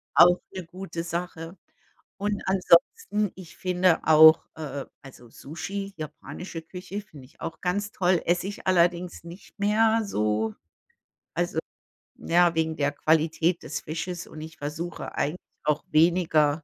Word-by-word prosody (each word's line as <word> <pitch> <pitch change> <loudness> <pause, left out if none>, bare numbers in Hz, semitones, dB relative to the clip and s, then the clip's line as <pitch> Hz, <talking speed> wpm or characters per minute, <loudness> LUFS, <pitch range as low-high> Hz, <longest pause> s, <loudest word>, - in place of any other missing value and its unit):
Auch 175 +1 +7
'ne 185 -3 -6
gute 180 -1 -6
Sache. 170 0 -5 0.6
Und 205 0 -2
ansonsten, 195 - +2
ich 185 -3 -12
finde 180 -2 +2
auch, 160 0 +8
äh, 145 -3 -5 0.2
also 125 -3 -14
Sushi, 195 - -6
japanische 160 +3 -7
Küche, 185 +4 -7
finde 150 -9 -14
ich 130 - -23
auch 160 -1 -5
ganz 205 +4 -1
toll, 180 -4 +2
esse 175 +2 +1
ich 205 - -7
allerdings 175 -1 +2
nicht 170 +3 -13
mehr 220 +2 +3
so 110 - 0 0.8
also - - -1 0.6
ja, 175 0 +3
wegen 160 0 0
der 145 0 +1
Qualität 160 +3 +1
des - - -4
Fisches 175 +3 -5
und 155 - -10
ich 160 +1 -9
versuche 155 +4 -5
eigentlich 150 +5 -1 0.3
auch 150 0 +1
weniger 160 -2 +3
170 Hz, 135 wpm, -26 LUFS, 155-185 Hz, 0.8 s, auch